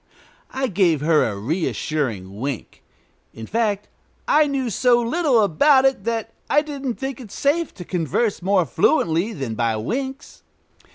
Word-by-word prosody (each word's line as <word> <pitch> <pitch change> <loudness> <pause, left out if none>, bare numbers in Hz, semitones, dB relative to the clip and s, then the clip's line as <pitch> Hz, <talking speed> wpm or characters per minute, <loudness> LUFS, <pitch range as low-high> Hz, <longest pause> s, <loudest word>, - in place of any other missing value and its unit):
I 265 0 -2
gave 180 - +2
her 155 0 +3
a 105 -3 -3
reassuring 120 - -2
wink. 135 -1 -5 0.5
In 115 - -7
fact, 210 - -1 0.4
I 300 0 +4
knew 265 -4 -2
so 240 +4 +3
little 245 -1 +2
about 265 - +4
it 265 -7 +1
that 225 -1 -2 0.2
I 295 +1 +4
didn't 280 -5 -4
think 270 -1 -5
it 230 - -11
safe 310 +4 0
to 180 - -9
converse 180 - -1
more 190 -1 +2
fluently 165 +5 +1
than 135 - -4
by 115 0 0
winks. 265 - -5
210 Hz, 150 wpm, -22 LUFS, -, 0.5 s, I